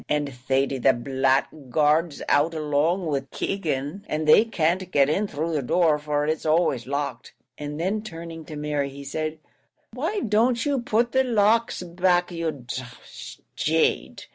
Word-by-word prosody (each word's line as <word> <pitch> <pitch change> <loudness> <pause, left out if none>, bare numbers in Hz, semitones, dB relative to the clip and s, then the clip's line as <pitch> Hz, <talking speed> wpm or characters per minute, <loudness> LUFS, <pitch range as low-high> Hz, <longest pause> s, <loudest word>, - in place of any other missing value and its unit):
and 145 -2 0
Thady 135 +2 -1
the - - +4
blackguard's 140 +4 +1
out 150 +3 +2
along 155 +4 0
wid 140 -4 -2
Keegan, 160 0 -3
and 155 0 -2
they 185 +9 +7
can't 180 -3 0
get 140 -2 +4
in 205 +6 0
through 160 0 -3
the 150 - 0
door, 155 +3 +2
for 150 0 -1
it's 155 +1 -1
always 155 -6 +1
locked;" 140 -3 -4 0.2
and 150 +1 -6
then 195 +5 -1
turning 165 -5 -8
to 155 - -8
Mary, 150 -1 -2
he 140 +1 -10
said, 155 +3 -3 0.6
"why 330 - -2
don't 230 - +2
you 280 -3 0
put 235 +1 +1
the 265 0 +3
locks 230 -3 +2
back, 180 0 +1
you 165 -1 -2
d 130 -5 -8
d - - -7 0.7
jade? 160 +1 0
155 Hz, 160 wpm, -24 LUFS, 145-185 Hz, 0.7 s, they